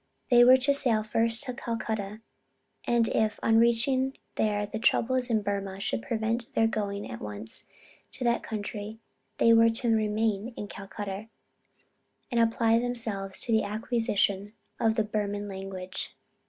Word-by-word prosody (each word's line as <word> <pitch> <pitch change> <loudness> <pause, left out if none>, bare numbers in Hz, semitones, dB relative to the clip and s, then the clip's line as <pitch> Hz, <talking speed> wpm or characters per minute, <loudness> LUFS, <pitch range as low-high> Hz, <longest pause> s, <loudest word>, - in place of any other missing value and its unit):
They 240 0 +8
were 255 +2 +8
to 270 +2 +2
sail 230 -6 +4
first 225 +3 +1
to 255 -3 -5
Calcutta, 220 -4 -4 0.6
and 235 -1 +2
if 215 -1 0
on 225 0 +4
reaching 255 +3 +3 0.2
there 205 -1 0
the 215 +2 -6
troubles 250 +2 +1
in 220 -3 +1
Burmah 195 -1 -3
should 115 - -2
prevent 225 - -2
their 225 - +4
going 205 -2 -2
at 110 - -8
once 105 +1 -4 0.5
to 255 - -5
that 235 -1 +1
country, 215 0 -6 0.4
they 230 - +5
were 230 0 +6
to 230 0 +1
remain 215 +1 -1
in 205 - -5
Calcutta, 200 +1 -7 1.0
and 240 - +1
apply 230 0 +3
themselves 225 -6 -2
to 235 - 0
the 220 -1 +4
acquisition 210 -2 -1 0.3
of 220 -1 +2
the 220 - +2
Burman 205 -1 -3
language. 190 -1 -6
220 Hz, 150 wpm, -28 LUFS, 205-230 Hz, 1.0 s, They